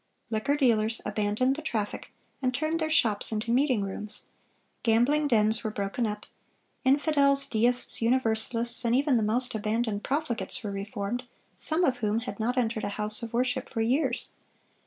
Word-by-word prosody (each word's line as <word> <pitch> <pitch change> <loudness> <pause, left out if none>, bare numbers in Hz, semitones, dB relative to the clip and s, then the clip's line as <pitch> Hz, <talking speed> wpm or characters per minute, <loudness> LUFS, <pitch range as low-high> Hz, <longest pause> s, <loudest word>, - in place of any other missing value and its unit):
Liquor 255 +7 0
dealers 225 -5 +2
abandoned 210 +5 0
the 310 - -6
traffic, 220 -10 -4 0.3
and 255 -1 0
turned 315 +3 -1
their 315 -1 -1
shops 225 -11 +2
into 220 +1 -2
meeting 255 -4 +2
rooms; 205 +2 -5 0.6
gambling 245 +7 +2
dens 220 -3 +2
were 220 - -1
broken 210 +3 -2
up; 210 0 -5 0.6
infidels, 280 0 +3
deists, 240 +3 0
Universalists, 235 0 +2
and 235 0 +2
even 280 0 +2
the 230 - +2
most 245 +4 0
abandoned 215 0 -2
profligates 275 -5 -2
were 205 - -4
reformed, 200 +4 -4 0.3
some 320 +3 +1
of 260 -6 +2
whom 220 -1 -1
had 250 - -7
not 245 +4 -1
entered 225 -3 0
a - - -1
house 215 +1 +4
of 230 -1 -5
worship 245 +1 -1
for 225 - -3
years. 255 +8 0
235 Hz, 160 wpm, -27 LUFS, 215-260 Hz, 0.6 s, house